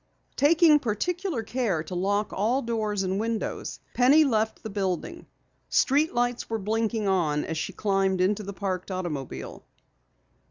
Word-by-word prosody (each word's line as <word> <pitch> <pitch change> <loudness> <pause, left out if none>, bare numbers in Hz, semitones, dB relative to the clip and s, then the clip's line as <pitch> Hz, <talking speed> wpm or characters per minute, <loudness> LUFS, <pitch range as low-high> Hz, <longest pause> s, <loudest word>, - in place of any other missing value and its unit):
Taking 310 +1 +5
particular 300 - -2
care 215 -9 -1
to 185 - -8
lock 205 +3 0
all 235 +7 +1
doors 215 -4 -1
and 190 +1 -1
windows, 225 0 -3
Penny 275 +5 +6
left 220 -5 0
the 220 - -6
building. 195 - -3 0.4
Street 290 +4 +3
lights 245 0 0
were 225 - -1
blinking 220 +1 -1
on 160 -6 +1
as 160 -1 -3
she 195 - -3
climbed 195 -1 0
into 195 +3 +2
the 200 -1 -6
parked 190 -2 -4
automobile. 175 -8 -5
210 Hz, 145 wpm, -26 LUFS, 190-245 Hz, 0.4 s, Penny